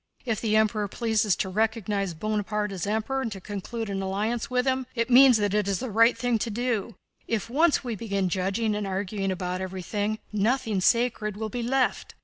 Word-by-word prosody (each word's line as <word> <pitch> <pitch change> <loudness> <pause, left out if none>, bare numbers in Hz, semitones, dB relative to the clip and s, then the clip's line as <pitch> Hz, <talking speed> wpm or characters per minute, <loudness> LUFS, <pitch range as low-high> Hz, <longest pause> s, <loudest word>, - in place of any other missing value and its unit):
If 225 -5 -1
the 215 -2 +1
Emperor 215 -1 +2
pleases 220 -2 +1
to - - -2
recognize 205 -3 -1
Bonaparte 210 +2 -2
as 190 -1 -4
Emperor 220 +6 -1
and 230 -4 -3
to 195 - -8
conclude 215 +4 -5
an 195 -1 -3
alliance 215 +7 -2
with 250 0 +1
him, 260 -1 0
it 230 +1 -1
means 255 -1 +8
that 205 -2 0
that 210 -1 +1
is 200 -1 +1
the 255 +1 -4
right 230 +3 +4
thing 245 -2 0
to 230 - -2
do. 230 -1 -2 0.3
If 225 0 -2
once 315 +3 +3
we 240 -3 -3
begin 200 -3 -1
judging 195 +5 0
and 210 -1 -2
arguing 195 0 -2
about 180 0 -3
everything, 205 +3 -3 0.2
nothing 215 -1 +1
sacred 220 -2 +1
will 220 0 -3
be 240 +3 -4
left! 255 +2 0
215 Hz, 195 wpm, -26 LUFS, 200-235 Hz, 0.3 s, means